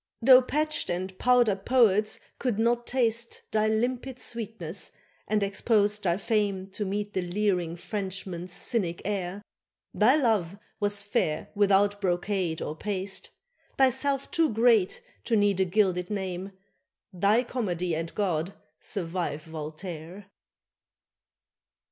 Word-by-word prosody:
Though 255 +1 +8
patched 305 +4 0
and 185 +2 -3
powdered 240 -6 +3
poets 215 -4 +3 0.2
could 245 -6 -1
not 235 +1 +1
taste 235 -2 0
Thy 215 0 +2
limpid 245 +4 -1
sweetness, 215 -8 -4 0.3
and 210 -1 +1
exposed 205 0 +1
thy 170 0 +2
fame 200 -2 -1
To 205 +2 -3
meet 205 +1 -3
the 185 - 0
leering 180 -2 0
Frenchman's 185 -2 -5
cynic 180 -5 -2
air, 195 -1 -3 0.5
Thy 230 +6 +5
love 215 - +1 0.2
was 205 -1 +1
fair 200 -7 -1
without 205 0 +3
brocade 180 -2 -1
or 150 - -4
paste, 195 +1 -2 0.5
Thyself 275 +1 +2
too 325 -1 +3
great 225 -3 +3 0.2
to 230 - +2
need 205 -2 +3
a 190 - +4
gilded 185 -2 +1
name; 190 -2 -4 0.6
Thy 200 +6 +3
Comedy 180 -9 -2
and 165 +1 -3
God 180 -3 -1 0.2
survive 170 -4 -3
Voltaire. 165 +4 -8
200 Hz, 120 wpm, -27 LUFS, 180-225 Hz, 0.6 s, Though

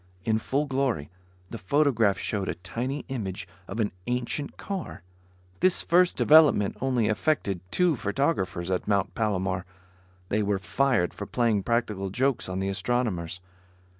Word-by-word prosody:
In 110 -1 +2
full 140 +6 -1
glory, 130 - -1 0.4
the 115 - -6
photograph 115 -2 +2
showed 100 -3 -2
a - - -2
tiny 120 +11 -4
image 100 -9 -4 0.2
of 100 - -6
an 105 -2 +1 0.2
ancient 125 +4 -2
car. 190 - -6 0.6
This 185 -1 +3
first 180 +1 +3
development 150 -10 +5
only 125 -4 +1
affected 110 - 0
two 180 - +3
photographers 100 - -1
at 90 - -1
Mount 100 -2 +1
Palomar. 95 -4 -1 0.7
They 105 - +1
were 100 -1 +1
fired 95 +2 +1
for 100 - -7
playing 115 -4 +1
practical 105 -3 -1
jokes 130 +2 0
on 90 - -3
the 95 0 -1
astronomers. 95 -4 -1
110 Hz, 140 wpm, -27 LUFS, 95-135 Hz, 0.7 s, development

